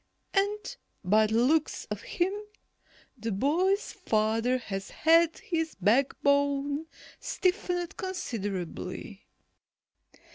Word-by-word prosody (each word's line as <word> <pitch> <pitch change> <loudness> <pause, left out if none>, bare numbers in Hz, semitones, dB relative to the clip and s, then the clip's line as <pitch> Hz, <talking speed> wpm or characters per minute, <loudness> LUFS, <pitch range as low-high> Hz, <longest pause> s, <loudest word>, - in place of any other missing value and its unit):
And 410 +1 0 0.3
by 215 +3 +4
the 220 - -1
looks 310 +4 +1
of - - -3
him, 360 +2 -1 0.8
the 225 -2 -4
boy's 345 - +1
father 225 - +1
has 195 -5 -5
had 330 +1 +4
his 325 -2 -2
backbone 280 - +2 0.3
stiffened 360 -2 -1
considerably." 205 - -5
280 Hz, 85 wpm, -29 LUFS, 220-350 Hz, 0.8 s, by